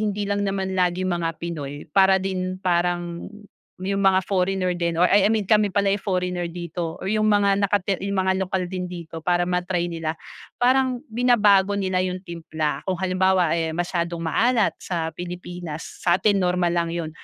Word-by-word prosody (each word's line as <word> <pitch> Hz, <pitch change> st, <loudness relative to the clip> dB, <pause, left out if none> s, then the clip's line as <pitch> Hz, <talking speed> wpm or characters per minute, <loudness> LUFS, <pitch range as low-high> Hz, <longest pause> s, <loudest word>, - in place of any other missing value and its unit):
hindi 205 Hz, -1 st, -1 dB
lang 200 Hz, 0 st, -1 dB
naman 190 Hz, -1 st, -2 dB
laging 185 Hz, 0 st, +1 dB
mga 170 Hz, -1 st, -1 dB
Pinoy 145 Hz, -4 st, -6 dB
para 190 Hz, +1 st, +5 dB
din 185 Hz, -1 st, -2 dB
parang 175 Hz, -1 st, -1 dB, 0.5 s
yung 195 Hz, +1 st, -1 dB
mga 190 Hz, -1 st, +4 dB
foreigner 185 Hz, -1 st, 0 dB
din 170 Hz, -1 st, 0 dB
or 180 Hz, +2 st, +3 dB
ah, 200 Hz, -, +6 dB
I 200 Hz, -, +4 dB
mean 220 Hz, -1 st, +2 dB
kami 210 Hz, +1 st, +3 dB
pala 200 Hz, -1 st, +2 dB
yung 200 Hz, -, +1 dB
foreigner 180 Hz, -2 st, -1 dB
dito 170 Hz, -1 st, -5 dB
or 190 Hz, -, -2 dB
yung 215 Hz, 0 st, +2 dB
mga 200 Hz, -1 st, +3 dB
nakati 200 Hz, -1 st, 0 dB
yung 200 Hz, -, -2 dB
mga 190 Hz, 0 st, +1 dB
lokal 190 Hz, 0 st, -1 dB
din 185 Hz, -1 st, -3 dB
dito 170 Hz, -2 st, -7 dB
para 175 Hz, +2 st, +1 dB
ma-try 180 Hz, 0 st, -1 dB
nila, 160 Hz, -1 st, -3 dB, 0.4 s
parang 255 Hz, 0 st, +2 dB
binabago 210 Hz, -5 st, +4 dB
nila 190 Hz, -2 st, 0 dB
yung 185 Hz, 0 st, -2 dB
timpla. 160 Hz, -4 st, -3 dB
Kung 190 Hz, -, 0 dB
halimbawa, 185 Hz, -2 st, +2 dB
eh, 160 Hz, -1 st, -2 dB
masyadong 170 Hz, -1 st, -2 dB
maalat 225 Hz, +7 st, +2 dB
sa 165 Hz, -3 st, -3 dB
Pilipinas 175 Hz, -1 st, -7 dB, 0.2 s
satin 195 Hz, +3 st, +3 dB
normal 180 Hz, -1 st, +1 dB
lang 170 Hz, -1 st, 0 dB
yo'n, 165 Hz, -2 st, -3 dB
185 Hz, 175 wpm, -23 LUFS, 175-195 Hz, 0.5 s, ah